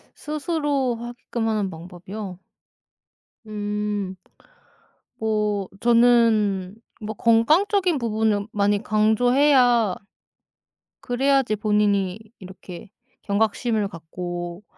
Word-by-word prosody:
스스로 295 -4 -1
하게끔 235 0 -5
하는 210 -3 0
방법이요? 180 +3 -8 1.1
음 210 -2 -3 1.0
뭐 210 -3 -1
저는 230 -5 +3 0.3
뭐 215 +1 -5
건강적인 335 - +3
부분을 220 -3 0
많이 205 0 +1
강조해야 240 0 +3 1.1
그래야지 265 -2 +1
본인이 205 -2 +1 0.2
이렇게 185 0 -11 0.3
경각심을 215 +1 0
갖고 175 +1 -7
215 Hz, 185 characters per minute, -23 LUFS, 200-240 Hz, 1.1 s, 저는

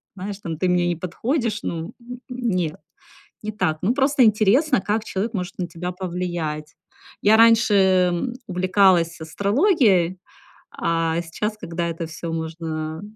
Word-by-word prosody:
знаешь, 195 +1 -6
там: 165 -5 -5
"ты 185 - 0
мне 180 -1 +2
не 175 - 0
подходишь", 225 - -2
ну, 170 +5 -4
н 245 +1 -8
н 250 -1 -2
нет, 175 -6 -1 0.7
не 215 - -3
так. 180 -7 0
Ну 215 +6 +2
просто 275 0 +3
интересно, 220 - +3
как 210 +3 -1
человек 215 +4 -3
может 185 -2 -3
на 180 - -1
тебя 180 +1 -5
повлиять. 175 -4 -4 0.5
Я 215 +2 +5
раньше, 230 -1 +5
э, 190 -2 +4
м, 175 +8 -2
увлекалась 185 -3 +2
астрологией, 200 - +2 0.6
а 165 0 0
сейчас, 210 +6 -4
когда 170 -2 -3
это 165 0 -4
всё 165 +1 -6
можно, 160 -1 -4
а - - -14
185 Hz, 155 wpm, -22 LUFS, 165-215 Hz, 0.7 s, Я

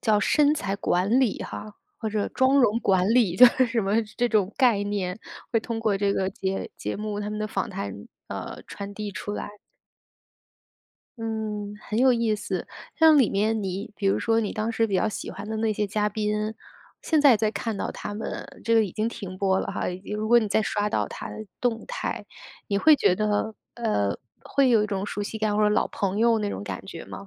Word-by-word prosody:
叫 215 -2 +3
身 295 +7 +3
材 200 -9 -2
管 200 +5 +2
理 245 -6 +1
哈， 210 -1 -7 0.2
或 220 - -2
者 210 -1 -1
妆 260 +2 +3
容 230 -2 +3
管 190 -4 +3
理。 215 -8 +3
就 250 - +10
是 255 +1 +3
什 230 0 0
么 205 +4 +2
这 245 0 +2
种 210 -3 +1
概 240 -7 +4
念， 200 -2 -2 0.3
会 225 - +3
通 230 0 -4
过 215 -3 +1
这 200 0 +2
个 190 -1 0
节 190 0 -3
节 - - -4
目 210 0 -3
他 205 - -3
们 210 - -4
的 215 - -1
访 - - -2
谈， 100 0 -6 0.2
呃， - - -6
传 200 0 -7
递 210 0 -4
出 205 - -5
来。 205 0 -6 1.6
嗯， 215 -2 -3
很 215 - -3
有 260 0 +6
意 230 -2 +1
思。 - - -3 0.3
像 320 -2 +6
里 250 -7 +5
面 215 +2 +1
你 195 +2 -4
比 200 - -2
如 195 - +2
说 225 -1 +2
你 215 -3 -1
当 215 +1 -2
时 225 0 +1
比 200 - -3
较 190 +4 +2
喜 215 - -5
欢 210 - -8
的 220 - -3
那 220 0 +1
些 210 0 -1
嘉 210 +1 0
宾， 210 +1 -2 0.5
现 315 -2 +2
在 275 -6 +7
再 215 0 +1
看 225 -1 -3
到 - - -3
他 205 - -6
们， 215 - -5 0.2
这 230 - 0
个 225 -1 +5
已 185 - -6
经 215 +1 -1
停 195 -5 -7
播 190 -1 +2
了 - - -2
哈。 - - -4 0.3
如 215 +1 -2
果 240 +1 +7
你 220 - 0
再 220 +2 +2
刷 210 -1 0
到 - - -1
他 - - -7
的 215 - -7 0.2
动 235 -2 0
态， - - -3 0.4
你 200 -2 +1
会 310 +9 +7
觉 185 -10 +3
得， 215 +1 0 0.2
呃， 210 - 0 0.3
会 275 -2 +2
有 220 -3 +4
一 - - -2
种 195 -2 -2
熟 205 - -4
悉 205 +2 -4
感 215 -1 0
或 210 - +3
者 - - +5
老 210 - +2
朋 195 0 -2
友 230 0 +4
那 210 -1 -1
种 - - -4
感 195 - -6
觉 170 -4 -8
吗？ 200 - -9
215 Hz, 240 characters per minute, -25 LUFS, 200-225 Hz, 1.6 s, 就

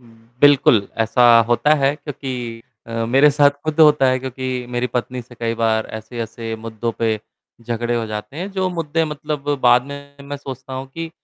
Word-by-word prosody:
हुँ, 120 - -20 0.3
बिल्कुल 135 -8 +5
ऐसा 115 +2 +3 0.2
होता 150 +6 +3
है, 140 -1 +2
क्योंकि 125 -6 -6 0.2
अ, 115 0 -3
मेरे 135 +5 +5
साथ 145 0 +5
खुद 155 0 -3
होता 150 -3 +6
है 130 0 +2
क्योंकि 130 -1 -4
मेरी 120 0 -1
पत्नी 125 +1 -2
से 120 +1 -16
कई 115 -1 -2
बार 110 -1 +1
ऐसे-ऐसे 115 0 -6
मुद्दों 115 +1 -4
पे 115 - +1 0.5
झगड़े 120 +1 -2
हो 115 - -1
जाते 105 +4 -6
हैं। 185 +5 -4
जो 190 -1 0
मुद्दे 165 -1 -1
मतलब 150 -1 -5
बाद 125 0 +5
में, 140 0 -10
मैं 145 +1 -6
सोचता 135 -1 -9
हूँ 130 +1 -5
कि 165 +5 -7
130 Hz, 180 wpm, -20 LUFS, 115-145 Hz, 0.5 s, होता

